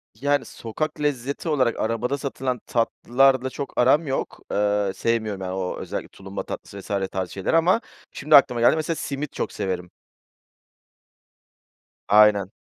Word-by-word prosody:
Yani, 145 +1 0
sokak 150 +7 -5
lezzeti 140 +2 -2
olarak 130 -6 +1
arabada 115 +5 -1
satılan 130 -2 -3
tatlılarla 130 +3 +2
çok 140 +1 -6
aram 145 +5 +4
yok. 135 - -3
Eee, 105 -1 +1
sevmiyorum 110 -4 -1
yani, 95 -1 -4
o 95 -1 -3
özellikle - - -5
tulumba 95 0 -7
tatlısı 100 - -8
vs. 95 0 -2
tarzı 95 -3 -3
şeyleri 100 - +1
ama 180 +8 +3 0.3
şimdi 150 +2 +3
aklıma 125 -4 +5
geldi. 120 - +5
Mesela 160 +1 -1
simit 140 0 -4
çok - - -3
severim. 90 -3 -3 2.2
Aynen. 105 -2 +5
120 Hz, 140 wpm, -24 LUFS, 100-140 Hz, 2.2 s, aklıma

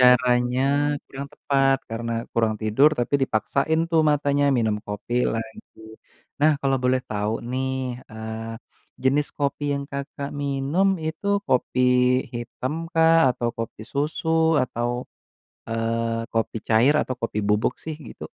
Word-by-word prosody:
caranya 125 +3 +3
kurang 140 +1 -7
tepat 135 -1 +2
karena 115 0 -3
kurang 110 -2 +1
tidur 110 +7 +4
tapi 130 +4 0
dipaksain 140 +7 +1
tuh 165 -1 +2
matanya 145 -2 +2
minum 110 -6 +1
kopi 115 +4 -1
lagi. 110 0 -6 0.6
Nah, 150 -1 +5
kalau 135 -1 +2
boleh 130 0 +2
tahu 105 0 -2
nih, 130 0 -3
eee, 110 +1 -6 0.5
jenis 140 +3 +2
kopi 140 0 -2
yang, 140 0 -2
Kakak 140 0 -5
minum 145 +8 +1
itu 165 +6 -1
kopi 130 0 +1 0.5
hitam 125 +3 -4 0.2
kah 165 -1 +5 0.2
atau 120 -1 -2
kopi 115 -1 -5
susu 160 +2 +1
atau, 120 -1 -2 0.8
eee, 115 0 -1
kopi 115 0 -1
cair 115 +7 +4
atau 130 - -2
kopi 115 -2 -2
bubuk 105 +4 +1
sih, 160 - -4 0.2
gitu? - - -9
130 Hz, 130 wpm, -24 LUFS, 115-145 Hz, 0.8 s, Nah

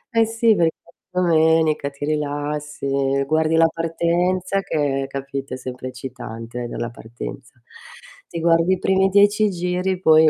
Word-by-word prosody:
Eh, 225 0 +5
sì 225 0 +3
perché 165 -3 +2 0.3
domenica 160 -4 +2
ti 140 +1 -6
rilassi, 145 -2 -1
guardi 155 +2 +2
la 165 0 +6
partenza 175 +4 0
che, 140 -6 -1
capito, 135 -1 -5
è - - -7
sempre 130 0 -7
eccitante 120 -2 -7
dalla 120 0 -4
partenza, 120 +2 -9 0.7
ti 170 - -5
guardi 165 +2 +3
i - - 0
primi 190 +1 +3
10 205 +2 +4
giri 180 0 -1
poi 160 -3 +6
155 Hz, 135 wpm, -21 LUFS, 135-180 Hz, 0.7 s, la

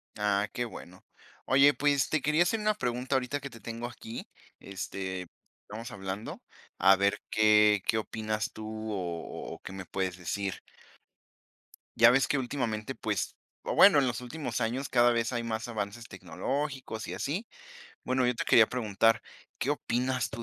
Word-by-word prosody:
Ah, 105 0 +1
qué 120 - -1
bueno. 90 -5 -11 0.4
Oye, 140 +2 +6
pues, 140 +1 +2
te 155 -3 +1
quería 150 +3 +3
hacer 220 +5 0
una 215 0 +2
pregunta 125 - -1
ahorita 130 +2 0
que 140 - -7
te 115 - -13
tengo 115 +2 -5
aquí, 115 -1 -8 0.3
este, 95 -1 -5 0.3
estamos 110 +3 -8
hablando, 95 +2 -6 0.4
a 95 0 +6
ver 100 +1 +1
qué 105 -1 +5
qué 110 - +2
opinas 110 -1 -2
tú 110 - -8 0.3
o 85 -4 -5
o - - -10
qué - - -8
me 95 -1 -7
puedes 95 -2 -2
decir. 95 +2 -3 1.4
Ya 115 +1 +8
ves 135 +2 +3
que 145 - +1
últimamente, 120 -5 -2
pues, - - -2 0.3
o - - -2
bueno, 190 -7 +8
en 135 - +2
los 120 0 -2
últimos 135 0 -4
años 125 +5 -1
cada 120 -1 +4
vez 115 +1 0
hay 120 -1 -1
más 110 0 -3
avances 110 0 -5
tecnológicos 125 - -4
y - - -5
así. 180 +11 -3 0.6
Bueno, 130 0 +1
yo 125 - +2
te - - -2
quería 110 -2 +6
preguntar, 115 -1 +2 0.4
¿qué 140 - 0
opinas 125 -2 0
tú 115 - -6
115 Hz, 165 wpm, -29 LUFS, 105-130 Hz, 1.4 s, Ya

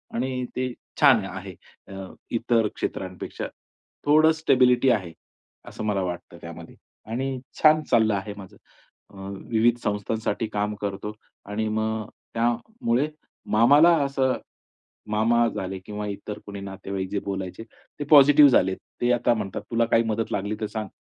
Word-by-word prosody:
आणि 125 +1 -2
ते 125 -1 -2 0.3
छान 130 -9 +6
आहे, 95 0 -8 0.4
अ, 95 -1 -7 0.2
इतर 115 -1 +2
क्षेत्रांपेक्षा. 90 -1 -5 0.6
थोडं 155 +2 +6
स्टेबिलिटी 130 -3 +4
आहे, 95 -8 0 0.6
असं 110 - -6
मला 100 -2 0
वाटतं 90 -1 -6
त्यामध्ये. - - -10 0.4
आणि 130 +2 -2 0.2
छान 155 0 +6
चाललं 110 -3 +4
आहे 100 +1 -4
माझं. 95 -2 -12 0.5
अ, - - -17 0.4
विविध 115 +1 +3
संस्थांसाठी 105 +1 -2
काम 105 0 -1
करतो 100 +1 -4 0.4
आणि 110 +1 -1
मग 110 0 -1
अ, - - -17 0.2
त्यामुळे 120 - 0 0.5
मामाला 145 +10 +6
असं 135 -2 +1 0.8
मामा 115 +2 +3
झाले 95 -2 -4
किंवा 105 0 -5
इतर 105 +1 -6
कोणी 100 -1 -7
नातेवाईक 95 -1 -5
जे 100 - -1
बोलायचे, 95 +1 -4 0.4
ते - - -1
पॉझिटिव्ह 145 -1 +8
झालेत. 95 -5 +3 0.2
ते 120 0 +3
आता 120 0 +2
म्हणतात, 105 -4 -4
"तुला 115 0 +2
काही 115 0 +3
मदत 110 +1 -2
लागली 105 +2 -2
तर - - 0
सांग, 110 -1 -5
110 Hz, 145 wpm, -25 LUFS, 100-125 Hz, 0.8 s, पॉझिटिव्ह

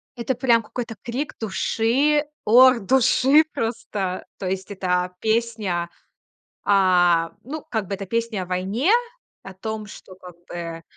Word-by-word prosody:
Это 245 +1 -2
прям 240 -2 +3
какой-то 230 +1 -6
крик 255 +5 -4
души. 235 +7 +1 0.2
Ор 250 +3 +7
души 265 +6 +4
просто. 205 -5 -3
То 190 - -4
есть 190 0 -3
эта 180 -2 -1
песня, 220 -6 -1 0.8
а, 175 -4 +3
ну, 300 +5 -6
как 220 -4 -2
бы, 195 - -3
это 195 0 -6
песня 230 -1 -2
о - - -6
войне, 190 - 0 0.5
о 195 - -9
том, 215 +3 -5
что 190 -2 -12
как 180 -2 -13
бы 165 -1 -6
215 Hz, 135 wpm, -23 LUFS, 185-235 Hz, 0.8 s, Ор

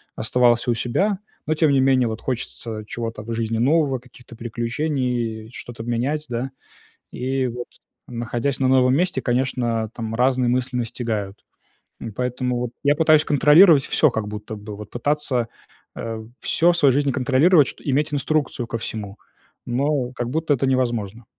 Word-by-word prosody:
оставался 120 +1 +2
у - - +3
себя, 185 - 0 0.3
но, 155 - +1
тем 155 -1 +3
не 135 -1 +4
менее, 130 -2 +3
вот 110 0 -5
хочется 115 -3 -5
чего-то 115 -2 -5
в 115 +1 -5
жизни 115 0 -1
нового, 135 +2 +2
каких-то 120 -1 -16
приключений, 120 -1 -2
э, - - -15
что-то 120 -2 -8
менять, 125 +6 -1
да. 125 +2 -3 0.6
И 130 +1 -1
вот, 120 0 -6 0.4
находясь 120 +3 -2
на 130 - +2
новом 130 0 +4
месте, 180 +4 0
конечно, 120 -3 0
там 115 -1 -4
разные 125 0 +2
мысли 125 0 0
настигают. 110 -4 -3 0.6
И 115 - -5
поэтому 125 +2 -2
вот 125 -1 -3
я 145 - +4
пытаюсь 155 -1 +4
контролировать 150 +1 +6
всё 155 - +3
как 110 -3 -3
будто 105 +1 -6
бы. 105 0 -8
Вот 105 0 -10
пытаться, 130 -2 -1 0.5
э, 110 -1 -5 0.2
всё 175 +2 +3
в - - -2
своей 145 -5 +5
жизни 140 0 +1
контролировать, 140 +4 +4
чт - - -9
иметь 145 +2 0
инструкцию 145 -4 -1
ко 115 - -4
всему, 105 -2 -6 0.5
но 130 +1 0
как 120 -1 -4
будто 155 +1 +1
это 135 0 0
невозможно. 120 -4 -1
125 Hz, 165 wpm, -22 LUFS, 115-140 Hz, 0.6 s, контролировать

